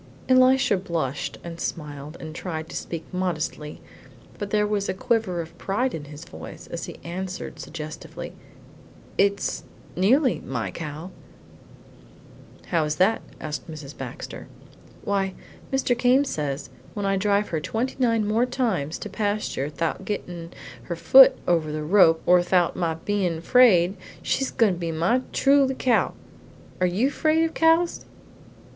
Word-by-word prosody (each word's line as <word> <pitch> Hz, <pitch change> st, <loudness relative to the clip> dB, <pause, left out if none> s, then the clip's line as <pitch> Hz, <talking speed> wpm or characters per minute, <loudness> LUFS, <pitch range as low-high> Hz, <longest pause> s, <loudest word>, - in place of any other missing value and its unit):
Elisha 255 Hz, -3 st, +5 dB
blushed 165 Hz, -7 st, -3 dB
and 170 Hz, -1 st, -7 dB
smiled, 150 Hz, -1 st, -5 dB
and 155 Hz, -1 st, -7 dB
tried 160 Hz, -2 st, -5 dB
to -, -, -8 dB
speak 165 Hz, -2 st, -5 dB
modestly, 160 Hz, -4 st, -3 dB, 0.6 s
but 205 Hz, -, -3 dB
there 210 Hz, 0 st, +2 dB
was 205 Hz, -1 st, -1 dB
a 190 Hz, -, -1 dB
quiver 205 Hz, -5 st, 0 dB
of 165 Hz, -, -10 dB
pride 240 Hz, +6 st, 0 dB
in 150 Hz, -2 st, -5 dB
his 145 Hz, 0 st, -10 dB
voice -, -, -10 dB
as -, -, -4 dB
he -, -, -9 dB
answered 180 Hz, -2 st, -5 dB
suggestively: 155 Hz, -1 st, -7 dB, 0.9 s
"It's 200 Hz, 0 st, +1 dB, 0.3 s
nearly 250 Hz, -, +3 dB
my -, -, -3 dB
cow." 155 Hz, +3 st, -6 dB, 1.6 s
"How 165 Hz, -3 st, +2 dB
is 150 Hz, 0 st, -1 dB
that?" 190 Hz, +7 st, +3 dB, 0.2 s
asked 150 Hz, +1 st, -5 dB
Mrs. 150 Hz, -3 st, -8 dB
Baxter. 125 Hz, -3 st, -7 dB, 0.6 s
"Why, 195 Hz, -2 st, 0 dB, 0.4 s
Mr. 265 Hz, -2 st, +1 dB
Came 250 Hz, +3 st, +4 dB
says 145 Hz, -, -3 dB, 0.2 s
when 205 Hz, -1 st, -2 dB
I 195 Hz, 0 st, +2 dB
drive 205 Hz, +1 st, +1 dB
her 160 Hz, -, -1 dB
twenty 225 Hz, -, -2 dB
nine 230 Hz, -4 st, +2 dB
more 225 Hz, +4 st, +2 dB
times 215 Hz, -, -1 dB
to -, -, -6 dB
pasture 205 Hz, -8 st, -2 dB
thout 165 Hz, +2 st, -2 dB
her -, -, -11 dB
gettin' 175 Hz, -5 st, -5 dB, 0.3 s
her 170 Hz, -, -5 dB
foot 265 Hz, +10 st, +8 dB
over 165 Hz, -3 st, +2 dB
the 155 Hz, 0 st, -3 dB
rope 165 Hz, -1 st, +5 dB
or 180 Hz, 0 st, +6 dB
thout 175 Hz, -1 st, +2 dB
my 165 Hz, -2 st, -1 dB
bein' 180 Hz, -1 st, -1 dB
afraid, 190 Hz, -1 st, +5 dB, 0.3 s
she's 270 Hz, -, 0 dB
goin' 225 Hz, -6 st, +3 dB
to 175 Hz, -, -6 dB
be 170 Hz, -2 st, -2 dB
my 170 Hz, +11 st, +2 dB
truly 275 Hz, -1 st, +3 dB
cow. 245 Hz, -3 st, +2 dB, 0.6 s
Are 185 Hz, -, +3 dB
you 215 Hz, +10 st, +1 dB
fraid 315 Hz, +1 st, +2 dB
of 325 Hz, -, -1 dB
cows?" 330 Hz, +1 st, +2 dB
185 Hz, 150 wpm, -25 LUFS, 160-230 Hz, 1.6 s, foot